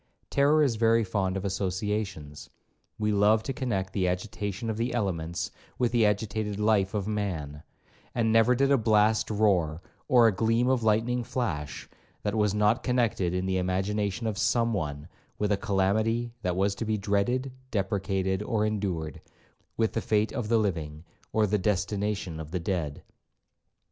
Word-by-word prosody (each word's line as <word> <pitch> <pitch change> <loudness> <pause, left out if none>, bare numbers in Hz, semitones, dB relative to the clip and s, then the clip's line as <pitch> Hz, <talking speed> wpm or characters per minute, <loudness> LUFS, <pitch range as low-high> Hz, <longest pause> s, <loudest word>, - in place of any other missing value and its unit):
Terror 145 +2 +4
is 125 -6 +1
very 115 0 +4
fond 95 -2 -1
of 95 - -4
associations; 95 -5 -3 0.5
we 105 0 0
love 105 +2 +4
to 135 - -3
connect 100 -9 -2
the 95 -3 +1
agitation 100 +3 -3
of 110 -1 -2
the 120 +2 -1
elements 85 -6 -2 0.3
with 120 -2 +1
the 115 -3 +4
agitated 105 0 -1
life 105 -2 +2
of 100 -1 -1
man; 85 -9 -3 0.5
and 115 -2 +2
never 115 +3 +5
did 140 +2 +2
a 140 - +5
blast 110 0 +3
roar, 95 -7 +2 0.3
or 125 -4 +6
a 115 - +6
gleam 115 +4 +2
of 130 -2 +2
lightning 115 +3 +1
flash, 80 - -3 0.4
that 105 - -1
was 105 -2 +2
not 105 +3 +3
connected 115 -8 +1
in 90 0 -1
the 95 0 0
imagination 100 +4 -1
of 110 -2 -2
some 115 -1 +2
one, 75 -5 -3 0.3
with 105 0 0
a - - +4
calamity 110 +4 0
that 90 -3 -1
was 100 +1 +2
to 100 - -5
be 110 -1 0
dreaded, 105 +7 0 0.2
deprecated, 95 -2 -1
or 105 -1 0
endured,—with 100 +2 -4
the - - -1
fate 105 0 +1
of 125 -5 -3
the 115 - +4
living, 80 -7 -2 0.3
or 110 -1 +3
the 105 +1 +1
destination 100 -2 -1
of 80 -1 -7
the 90 +2 -2
dead. 85 -5 -3
105 Hz, 165 wpm, -28 LUFS, 95-115 Hz, 0.5 s, or